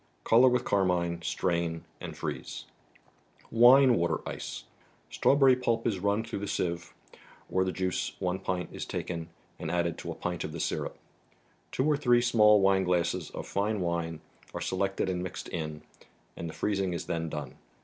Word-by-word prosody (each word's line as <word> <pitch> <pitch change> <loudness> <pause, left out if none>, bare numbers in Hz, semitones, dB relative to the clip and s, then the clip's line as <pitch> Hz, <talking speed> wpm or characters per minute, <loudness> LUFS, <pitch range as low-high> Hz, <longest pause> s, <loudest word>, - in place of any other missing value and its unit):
Color 120 +3 +6
with 125 0 +1
Carmine, 90 -3 +1
strain 85 -2 -1
and - - -7
freeze. - - -5 0.9
entire 120 +4 +8
aitater 85 -10 +1
%e. - - -6 0.5
Strawberry 135 -2 +5
pulp 115 -2 0
is 105 -5 0
run 100 +3 +1
through 115 -2 -5
the 100 - -4
sieve; 85 -2 -2 0.6
or 95 - +2
the 95 - -1
juice, 95 -1 -2
one 90 0 -1
pint, 90 -2 -3
is - - -5
taken 85 -2 -4 0.3
and 80 - -4
added 85 -1 0
to - - -5
a - - -6
pint 90 -2 -3
of 75 - -5
the - - -5
syrup. - - -2 0.7
Two 130 - 0
or 150 -1 +3
three 120 -3 +4
small 105 -3 +5
wineglasses 90 -3 +2
of - - -7
fine 105 +2 -1
wine 85 -2 -2 0.3
are - - -2
selected 95 +1 -1
and 90 -1 -1
mixed 90 -1 -6
in, 75 -2 -5 0.5
and 85 - -5
the - - -8
freezing 95 -3 0
is 85 - -4
then 80 -1 -2
done. 75 -4 -6
95 Hz, 170 wpm, -29 LUFS, 85-105 Hz, 0.9 s, entire